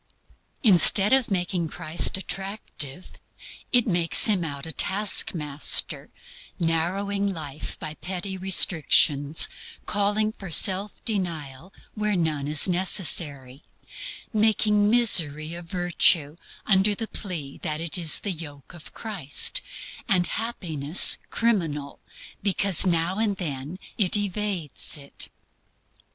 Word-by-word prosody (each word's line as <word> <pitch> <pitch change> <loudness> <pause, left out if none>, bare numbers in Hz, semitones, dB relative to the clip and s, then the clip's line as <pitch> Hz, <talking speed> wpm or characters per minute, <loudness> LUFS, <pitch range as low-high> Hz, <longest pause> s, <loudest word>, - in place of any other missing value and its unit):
Instead 200 +1 +4
of 265 -3 +2
making 180 -3 -2
Christ 165 +3 0
attractive, 190 -5 -7 0.6
it 245 -2 +4
makes 175 -5 +4
Him 200 -6 +2
out 140 -3 -6
a 160 - -5
taskmaster, 160 - +2 0.5
narrowing 195 +5 -2
life 155 -4 -8
by 155 - -7
petty 185 +3 -5
restrictions, 160 -5 +2 0.4
calling 210 +1 -1
for 195 -4 -11
self 195 +4 +1
denial 170 - -5 0.2
where 210 -1 -2
none 155 -5 -2
is 150 +3 +5
necessary, 155 -7 +1 0.7
making 210 -1 +1
misery 165 -10 +2
a 170 - -8
virtue 175 -3 0 0.3
under 200 +1 +3
the 225 +2 -5
plea 165 -12 -8
that 155 0 -4
it 165 -2 -3
is 165 -4 +4
the 205 - -3
yoke 150 -3 -11
of 170 -3 -15
Christ, 205 - -1 0.5
and 185 -4 +2
happiness 175 -10 +4
criminal 160 -12 -3 0.4
because 195 -2 +2
it - - +1
now 170 +3 -1
and 210 -3 -1
then 150 -1 -6 0.2
evades 200 -6 0
it. 140 -1 -7
180 Hz, 110 wpm, -23 LUFS, 155-200 Hz, 0.7 s, is